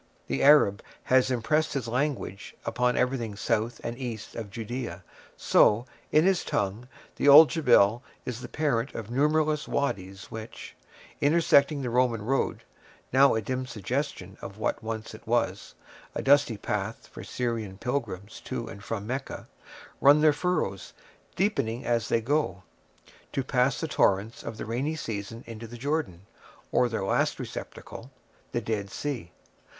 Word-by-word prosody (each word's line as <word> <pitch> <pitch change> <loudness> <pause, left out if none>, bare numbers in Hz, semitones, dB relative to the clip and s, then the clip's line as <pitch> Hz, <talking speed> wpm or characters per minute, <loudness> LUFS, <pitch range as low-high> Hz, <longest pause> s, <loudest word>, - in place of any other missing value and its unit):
The - - -2
Arab 140 -9 +6 0.2
has 130 0 +3
impressed 150 +6 +1
his 130 -5 -2
language 125 -5 -2
upon 125 0 +1
everything 125 -4 0
south 115 +2 -1
and 115 - -3
east 120 -4 -6
of 110 -3 -5
Judea, 120 +5 -5 0.3
so, 110 +3 +4 0.3
in 155 +2 +5
his 190 -2 +3
tongue, 105 +5 -2 0.3
the - - +1
old 150 +2 +10
Jebel 115 -8 +4 0.2
is 125 -1 -5
the - - -6
parent 140 -5 -1
of 115 0 -6
numberless 150 +3 +2
wadies 95 -8 -3
which, 110 0 -8 0.5
intersecting 145 -2 +4
the 125 - -2
Roman 120 -3 +2
road—now 135 +1 0
a 110 - -1
dim 130 +3 -3
suggestion 110 -4 -4
of 100 +1 -8
what 110 - -1
once 110 -1 -5
it 110 - -13
was, 115 -5 -1 0.4
a - - -2
dusty 140 -5 +4
path - - -3
for - - -10
Syrian 115 -6 -3
pilgrims 110 -5 -4
to 120 -3 -4
and 100 -1 -10
from 105 -3 -4
Mecca—run 135 +3 0
their 155 -1 +6
furrows, 145 - -2 0.4
deepening 130 - 0
as 120 -2 0
they 115 - +2
go, 120 - 0 0.7
to 135 - 0
pass 125 0 +1
the 160 - -2
torrents 105 -6 +1
of 115 - -7
the - - -5
rainy 130 +8 -2
season 115 -4 -5
into 115 0 -8
the 120 +2 -9
Jordan, 130 - -2 0.5
or 125 - +3
their 110 -4 -2
last - - +1
receptacle, 125 - -8 0.4
the 120 - -1
Dead 105 -3 -2
Sea. 130 - -4
120 Hz, 145 wpm, -27 LUFS, 110-140 Hz, 0.7 s, old